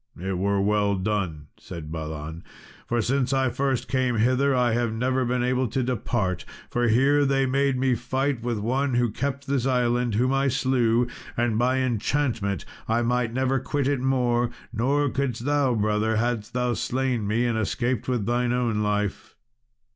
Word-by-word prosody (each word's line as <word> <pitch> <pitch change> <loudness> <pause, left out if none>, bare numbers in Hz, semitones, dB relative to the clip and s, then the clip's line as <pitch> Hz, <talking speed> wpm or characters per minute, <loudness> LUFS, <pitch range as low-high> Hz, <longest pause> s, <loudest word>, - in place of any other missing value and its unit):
"It 95 0 -3
were 100 +1 +1
well 100 0 +2
done," 95 -6 -2
said 80 -3 -8
Balan, 80 +1 -6 0.4
"for 120 -1 0
since 130 +2 0
I 135 -1 +2
first 130 0 -1
came 130 -2 +1
hither 130 +5 +2
I 125 -2 +2
have 120 -1 0
never 130 +3 0
been 125 0 0
able 125 +1 +1
to 130 +4 -1
depart, 110 - -1 0.3
for 120 0 +1
here 135 +6 +4
they 135 -1 +2
made 135 0 +1
me 130 0 +2
fight 130 +2 -1
with 120 -1 -2
one 130 +5 0
who 120 -2 +2
kept 140 +4 -3
this 135 -2 0
island, 120 -2 +1
whom 125 +4 +2
I 135 +1 +2
slew, 125 -3 +2 0.3
and 115 -2 +1
by 130 +2 +2
enchantment 120 - -1 0.2
I 115 +2 +1
might 120 -1 0
never 130 +2 +1
quit 140 +2 -1
it 140 -3 0
more; 125 -2 +1 0.2
nor 140 +6 +1
couldst 125 -3 -2
thou, 145 -4 +2
brother, 105 +1 +1
hadst 115 0 -1
thou 125 0 0
slain 125 -3 -1
me, 115 +4 +1
and 120 -1 0
escaped 120 +2 -1
with 125 -5 0
thine 120 +1 +1
own 120 -4 0
life." 105 -1 -2
120 Hz, 170 wpm, -25 LUFS, 110-130 Hz, 0.4 s, here